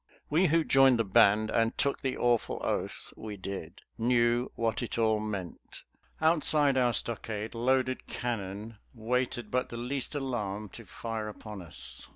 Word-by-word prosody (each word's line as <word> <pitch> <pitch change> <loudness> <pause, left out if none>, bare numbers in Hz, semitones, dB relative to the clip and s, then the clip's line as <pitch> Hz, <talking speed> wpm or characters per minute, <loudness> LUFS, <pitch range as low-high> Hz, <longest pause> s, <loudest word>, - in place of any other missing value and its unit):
We 175 +5 +4
who 165 +1 +3
joined 135 -3 +5
the 115 - +2
"Band," 105 +2 +4
and 115 0 +1
took 140 - 0
the 135 -1 -2
awful 120 -2 +1
oath - - -2
we 105 -2 -7
did, 95 -4 -7 0.2
knew 120 +1 +2
what 115 -2 -1
it 120 - -4
all 110 -1 +3
meant. 100 -5 -6 0.4
Outside 155 -3 +4
our 125 -2 +3
stockade 110 -2 -2
loaded 130 +2 0
cannon 105 -2 -4 0.2
waited 120 0 -2
but 125 0 0
the 120 - -6
least 130 +4 -3
alarm 105 -7 -3
to - - -11
fire 115 -2 -5
upon 105 -1 -8
us. 85 - -6
115 Hz, 155 wpm, -30 LUFS, 105-130 Hz, 0.4 s, joined